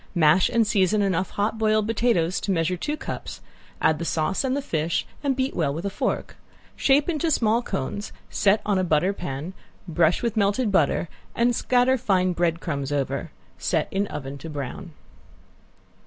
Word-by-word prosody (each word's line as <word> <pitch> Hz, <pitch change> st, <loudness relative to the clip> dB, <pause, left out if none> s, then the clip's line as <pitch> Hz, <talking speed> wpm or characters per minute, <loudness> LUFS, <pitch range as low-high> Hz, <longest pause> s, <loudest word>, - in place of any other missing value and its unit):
Mash 170 Hz, +2 st, +5 dB
and 230 Hz, -1 st, +3 dB
season 205 Hz, 0 st, +2 dB
enough 185 Hz, -2 st, 0 dB
hot 210 Hz, +2 st, -1 dB
boiled 215 Hz, -1 st, +2 dB
potatoes 215 Hz, -6 st, +1 dB
to 200 Hz, -, -1 dB
measure 170 Hz, 0 st, +1 dB
two 295 Hz, -, -3 dB
cups, -, -, -6 dB, 0.4 s
add 160 Hz, -, +2 dB
the -, -, -3 dB
sauce 165 Hz, -, 0 dB
and 265 Hz, +1 st, 0 dB
the -, -, +1 dB
fish 160 Hz, -, -1 dB, 0.2 s
and 275 Hz, -2 st, +1 dB
beat 260 Hz, +1 st, -1 dB
well 150 Hz, -5 st, +1 dB
with 165 Hz, +6 st, -5 dB
a 200 Hz, -, -1 dB
fork. -, -, -2 dB, 0.4 s
Shape 280 Hz, +1 st, +3 dB
in 330 Hz, -4 st, -1 dB
small 235 Hz, -9 st, +2 dB
cones, 205 Hz, -, -4 dB, 0.2 s
set 205 Hz, +1 st, +2 dB
on 200 Hz, -2 st, +2 dB
a -, -, +1 dB
butter 175 Hz, +3 st, +2 dB
pan, 165 Hz, -1 st, -5 dB, 0.3 s
brush 165 Hz, +2 st, +2 dB
with 235 Hz, -2 st, -1 dB
melted 205 Hz, +2 st, +1 dB
butter 170 Hz, -2 st, +2 dB, 0.3 s
and 235 Hz, +1 st, +2 dB
scatter 255 Hz, +1 st, +2 dB
fine 185 Hz, -4 st, +2 dB
bread 170 Hz, -1 st, 0 dB
crumbs 140 Hz, -5 st, -3 dB
over. 140 Hz, -2 st, -2 dB, 0.3 s
Set -, -, 0 dB
in 200 Hz, +1 st, 0 dB
oven 140 Hz, -3 st, -6 dB
to 165 Hz, -, -8 dB
brown. 150 Hz, +4 st, -6 dB
190 Hz, 175 wpm, -24 LUFS, 165-225 Hz, 0.4 s, Mash